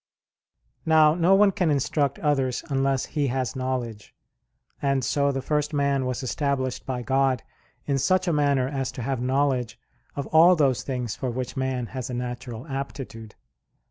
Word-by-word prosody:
Now 155 -1 +5
no 175 +3 +4
one 200 0 +5
can 180 -3 0
instruct 140 0 0
others 135 -4 0
unless 135 -1 +1
he 145 -3 -1
has 130 0 -2
knowledge, 125 -5 -4 0.7
and 140 -3 +1
so 140 +1 +1
the 135 -1 -3
first 150 0 -1
man 140 -2 +1
was 130 +1 -3
established 130 -1 -2
by 125 -2 -3
God 135 -1 +1 0.4
in 140 -2 0
such 185 +5 +2
a 170 - +2
manner 140 -3 +2
as 135 -2 -3
to 125 - -6
have 130 0 -2
knowledge 130 -2 0 0.4
of 140 - -3
all 170 +3 +7
those 140 -6 +2
things 125 -4 -3
for 130 - -3
which 125 +1 -4
man 130 -2 -1
has 130 +1 -6
a 125 - -4
natural 125 -1 -5
aptitude. 135 -6 -6
135 Hz, 165 wpm, -25 LUFS, 125-145 Hz, 0.7 s, all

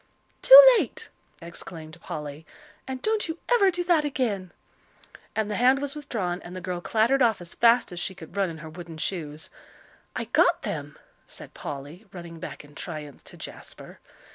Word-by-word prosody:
"Too - - +11 0.2
late!" 455 -1 -5 0.3
exclaimed 170 -1 -9
Polly. 150 0 -7 0.4
"And 260 -1 -6
don't 435 -2 0
you 320 +1 -4 0.2
ever 405 -5 +5
do 355 -1 -2
that 345 -3 +3
again." 225 -10 -2 0.8
And 215 -1 -1
the 205 - -2
hand 255 +3 +4
was 285 0 -3
withdrawn, 210 -12 -4
and 175 +1 -10
the - - -5
girl 180 -1 -4
clattered 230 +8 +2
off 230 -4 +3
as 175 -1 -8
fast 235 -1 +4
as 175 - -6
she 190 - -3
could 160 +1 -12
run 195 -2 +1
in 165 - -8
her - - -8
wooden 170 -1 -9
shoes. 155 -3 -5 0.6
"I - - -3
got - - +2
them," - - -5 0.3
said - - -11
Polly, 145 +9 -8
running 170 -2 -10
back 150 - -8
in 145 - -18
triumph 150 -3 -8
to - - -11
Jasper. - - -11
185 Hz, 175 wpm, -26 LUFS, 165-265 Hz, 0.8 s, Too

